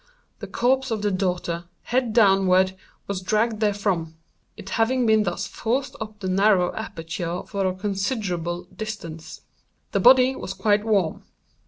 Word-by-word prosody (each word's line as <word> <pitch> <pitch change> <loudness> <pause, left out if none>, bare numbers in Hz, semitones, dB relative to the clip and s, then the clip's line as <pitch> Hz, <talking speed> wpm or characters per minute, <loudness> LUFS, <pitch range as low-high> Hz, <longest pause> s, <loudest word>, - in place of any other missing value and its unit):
the - - -7
corpse 265 +2 +1
of 220 -2 -2
the 205 - +1
daughter, 180 -2 -2 0.2
head 245 -1 0
downward, 190 -4 +4 0.3
was 200 -2 -3
dragged 215 +3 0
therefrom; 200 -6 -1 0.4
it 195 - -9
having 245 +2 +2
been 220 -1 +4
thus 175 -4 -2
forced 260 +5 -2
up 215 -1 -7
the 190 - -3
narrow 185 -1 +3
aperture 175 -4 -5
for 200 -2 -1
a 185 - -1
considerable 190 -4 -2
distance. 165 -8 -7 0.5
The - - +1
body 255 +1 +6
was 190 - -6
quite 205 +1 +2
warm. 200 -7 +1
200 Hz, 145 wpm, -24 LUFS, 185-220 Hz, 0.5 s, body